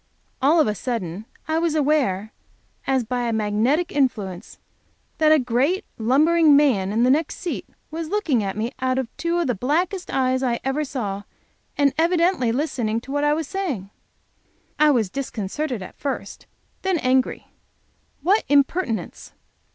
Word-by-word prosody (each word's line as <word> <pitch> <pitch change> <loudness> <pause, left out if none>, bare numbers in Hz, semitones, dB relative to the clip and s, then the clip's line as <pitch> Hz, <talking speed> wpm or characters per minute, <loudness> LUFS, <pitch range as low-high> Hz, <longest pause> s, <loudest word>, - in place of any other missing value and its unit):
All 300 +5 +4
of 310 - +5
a 210 - 0
sudden 210 -3 -4 0.2
I 315 +1 +1
was 330 -2 0
aware, 270 -10 +1 0.5
as 265 -2 +2
by 245 +1 -2
a - - 0
magnetic 220 +10 +1
influence, 210 -10 -1 0.6
that 310 -1 +5
a 310 - +7
great 270 - +1
lumbering 300 +6 +4
man 240 -10 +3
in 225 +3 +2
the 250 - +5
next 305 +3 +1
seat 350 - -5 0.2
was 320 0 -4
looking 325 - +1
at 195 0 -3
me 225 +3 -2
out 255 0 0
of 255 -2 -3
two 335 +1 -1
of 345 - +1
the 250 - +1
blackest 335 - -1
eyes 260 -1 +1
I 240 -3 0
ever 270 +3 0
saw, 210 -9 -4 0.6
and 280 -2 +3
evidently 335 -6 +2
listening 240 -5 -1
to 270 - -10
what 290 +1 0
I 295 0 +3
was 320 -2 -3
saying. 280 - -3 0.9
I 305 0 +6
was 225 -9 +2
disconcerted 250 -1 -3
at - - -12
first, 280 -2 -5 0.3
then 380 -2 +1
angry. 260 -3 0 0.7
What 395 +6 +3
impertinence. 280 -3 0
270 Hz, 160 wpm, -23 LUFS, 230-315 Hz, 0.9 s, a